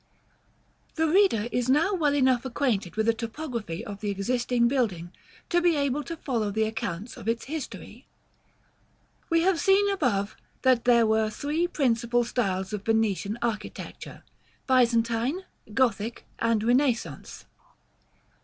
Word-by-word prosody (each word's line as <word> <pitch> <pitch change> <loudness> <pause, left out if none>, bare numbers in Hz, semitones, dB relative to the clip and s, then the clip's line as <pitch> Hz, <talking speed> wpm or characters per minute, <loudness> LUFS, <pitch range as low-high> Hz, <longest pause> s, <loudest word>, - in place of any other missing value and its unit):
§ - - -40
IX. - - -39
The 320 0 +2
reader 325 - +3
is 245 0 -1
now 310 +9 +3
well 300 -6 +1
enough 260 -3 +3
acquainted 240 -8 -1
with 220 0 +1
the 230 - +4
topography 230 - -5
of 205 0 -8
the 210 - -2
existing 240 +4 +1
building, 205 -10 -1 0.4
to 345 0 +2
be 345 -2 +3
able 285 0 0
to 335 - -6
follow 235 -8 -1
the 220 +2 0
accounts 220 -1 -4
of - - -9
its 230 0 -1
history. 305 +1 -7 1.2
We 330 0 +3
have 365 -1 +2
seen 390 +2 +4
above, 220 - 0 0.3
that 255 -3 +3
there 235 -2 +5
were 220 0 +2
three 295 +10 -1
principal 240 -6 +1
styles 195 -5 -2
of 210 - -3
Venetian 215 -2 0
architecture; 215 -3 -5 0.4
Byzantine, 240 +5 +2 0.3
Gothic, 230 -1 0
and 230 -2 +1
Renaissance. 245 +1 0
235 Hz, 140 wpm, -26 LUFS, 220-285 Hz, 1.2 s, there